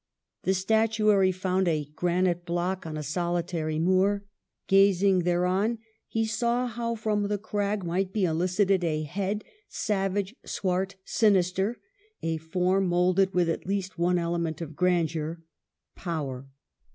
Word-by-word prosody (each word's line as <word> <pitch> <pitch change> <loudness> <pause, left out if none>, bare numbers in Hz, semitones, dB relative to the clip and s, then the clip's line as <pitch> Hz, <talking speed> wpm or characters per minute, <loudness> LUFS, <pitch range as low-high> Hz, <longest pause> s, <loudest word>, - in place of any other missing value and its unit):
The 190 - +2
statuary 215 -1 +3
found 185 0 0
a 155 -3 +1
granite 175 0 +1
block 175 +1 -2
on 155 -1 -5
a 150 - -4
solitary 170 -1 -2
moor; 190 +4 +2 0.4
gazing 195 -1 +4
thereon 180 +6 +1 0.3
he 225 0 0
saw 235 +3 0
how 235 -1 -3
from 210 -2 0
the 205 0 0
crag 205 -1 -2
might 185 +3 -1
be 200 -2 +1
elicited 180 +3 +1
a 155 -2 0
head, 195 +6 -2 0.3
savage, 195 0 -1
swart, 190 +1 -2
sinister; 195 +1 +2 0.4
a 165 0 0
form 180 +4 +1
moulded 180 +2 +2
with 175 -1 +3
at 165 - -2
least 195 -2 -3
one 180 +1 +2
ele 170 0 -1
ment 160 -2 -2
of 160 -3 -7
grandeur 165 -2 0 0.2
— - - -60
power. 140 -7 -4
185 Hz, 140 wpm, -27 LUFS, 170-200 Hz, 0.4 s, gazing